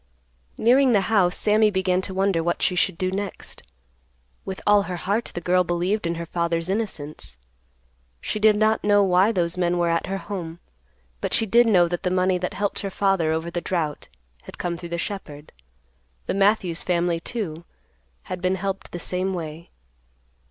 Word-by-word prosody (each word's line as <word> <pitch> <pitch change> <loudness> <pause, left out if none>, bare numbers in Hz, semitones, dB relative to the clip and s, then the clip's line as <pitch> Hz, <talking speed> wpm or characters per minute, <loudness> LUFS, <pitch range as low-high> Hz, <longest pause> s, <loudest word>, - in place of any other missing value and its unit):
Nearing 255 +2 +4
the 205 - +4
house 185 -4 +3
Sammy 215 0 +3
began 185 -2 +1
to 190 - -6
wonder 190 -3 +1
what 175 +1 -1
she 185 - +2
should 180 -1 +1
do 185 +1 -1
next. 200 0 -5 0.8
With 190 - -5
all 205 0 +5
her 180 - -2
heart 200 +6 -1
the 175 - -3
girl 180 +1 +3
believed 180 +3 -1
in 170 - -1
her 170 0 -5
father's 170 0 -2
innocence. 155 - -4 0.8
She 215 - -3
did 215 0 +5
not 215 +1 +2
know 205 0 +4
why 190 +3 +4
those 175 -3 -1
men 175 0 +1
were 170 -1 +1
at 165 0 0
her 195 - -2
home. 175 -5 -6 0.6
But - - -1
she 225 - +2
did 235 +3 +4
know 180 -6 +5
that 175 0 -3
the 180 - 0
money 185 0 +1
that 180 - -3
helped 205 0 -1
her 200 - -3
father 195 -5 +1
over 160 +2 -2
the 175 - -3
drought 160 -6 -2 0.4
had - - -11
come 175 -1 -2
through 170 0 -8
the 170 - -3
shepherd; 160 -6 -6 0.7
the - - -1
Matthews 195 -3 +2
family, 175 -1 0
too, 170 -5 -5 0.6
had 180 - -6
been 185 +1 +1
helped 195 +1 -4
the - - -3
same 185 +2 -2
way. 160 -1 -7
185 Hz, 185 wpm, -24 LUFS, 170-200 Hz, 0.8 s, all